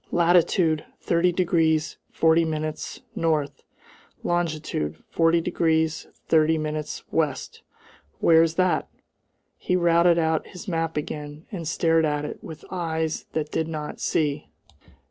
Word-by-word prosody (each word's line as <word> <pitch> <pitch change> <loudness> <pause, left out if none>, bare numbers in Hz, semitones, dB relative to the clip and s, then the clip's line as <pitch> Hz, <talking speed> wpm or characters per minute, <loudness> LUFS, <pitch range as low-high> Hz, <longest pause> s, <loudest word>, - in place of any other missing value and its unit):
Latitude, 170 -2 +3 0.2
30 175 +1 +2
degrees 165 -3 +1
40 165 +1 +3
minutes 155 -1 -4
N. 155 -3 +1 0.8
longitude, 155 - -2
40 165 0 +3
degrees 160 -2 0 0.2
30 160 0 +4
minutes 155 -1 -4
W. 155 -3 +2 0.9
where's 165 0 +4
that?" 185 0 +1 0.7
He 180 - -1
routed 170 -1 +4
out 160 -1 +1
his 185 +4 -10
map 165 -3 -2
again, 150 +1 -5
and 170 -6 -5
stared 165 -1 +2
at 150 -1 0
it - - -7
with 155 -2 -9
eyes 160 -3 -2
that 155 -1 -2
did 160 - -1
not 155 -2 -5
see. 145 -2 -1
160 Hz, 120 wpm, -25 LUFS, 155-170 Hz, 0.9 s, 30